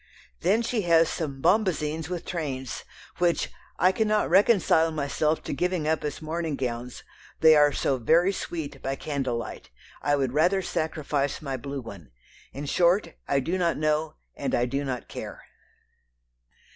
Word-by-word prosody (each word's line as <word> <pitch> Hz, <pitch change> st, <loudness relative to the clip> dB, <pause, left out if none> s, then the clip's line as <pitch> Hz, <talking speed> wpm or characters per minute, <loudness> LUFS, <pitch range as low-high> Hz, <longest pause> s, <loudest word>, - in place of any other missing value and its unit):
Then 225 Hz, -, +2 dB
she 230 Hz, -1 st, 0 dB
has 165 Hz, -1 st, +5 dB
some 140 Hz, -5 st, -4 dB
"bombazins" 165 Hz, -5 st, +1 dB
with 180 Hz, -2 st, -4 dB
trains, 135 Hz, -, -4 dB, 0.3 s
which 175 Hz, -1 st, +1 dB, 0.3 s
"I 185 Hz, -, +4 dB
cannot 215 Hz, +1 st, +1 dB
reconcile 190 Hz, -6 st, +4 dB
myself 155 Hz, +1 st, -1 dB
to -, -, -4 dB
giving 175 Hz, 0 st, -1 dB
up 160 Hz, 0 st, +1 dB
as 150 Hz, +1 st, -4 dB
morning 160 Hz, -1 st, -2 dB
gowns; 125 Hz, -1 st, -4 dB, 0.4 s
they 160 Hz, -1 st, +8 dB
are 145 Hz, -1 st, +6 dB
so 135 Hz, -1 st, 0 dB
very 170 Hz, -, +3 dB
sweet 150 Hz, -7 st, -5 dB
by 135 Hz, 0 st, -2 dB
candlelight. 135 Hz, -5 st, -4 dB, 0.3 s
I 145 Hz, -, +2 dB
would 135 Hz, -3 st, 0 dB
rather 180 Hz, +6 st, +3 dB
sacrifice 150 Hz, -5 st, -1 dB
my 135 Hz, -3 st, -4 dB
blue 140 Hz, +2 st, -5 dB
one... 100 Hz, -, -11 dB, 0.4 s
in 140 Hz, +2 st, -6 dB
short 175 Hz, +3 st, +2 dB
I 140 Hz, -, +2 dB
do 175 Hz, +7 st, -1 dB
not 170 Hz, -2 st, +1 dB
know 155 Hz, +1 st, 0 dB, 0.2 s
and -, -, -1 dB
I 120 Hz, -, +2 dB
do 140 Hz, +3 st, -2 dB
not 130 Hz, -3 st, -4 dB
care." -, -, -8 dB
155 Hz, 155 wpm, -26 LUFS, 140-170 Hz, 0.4 s, they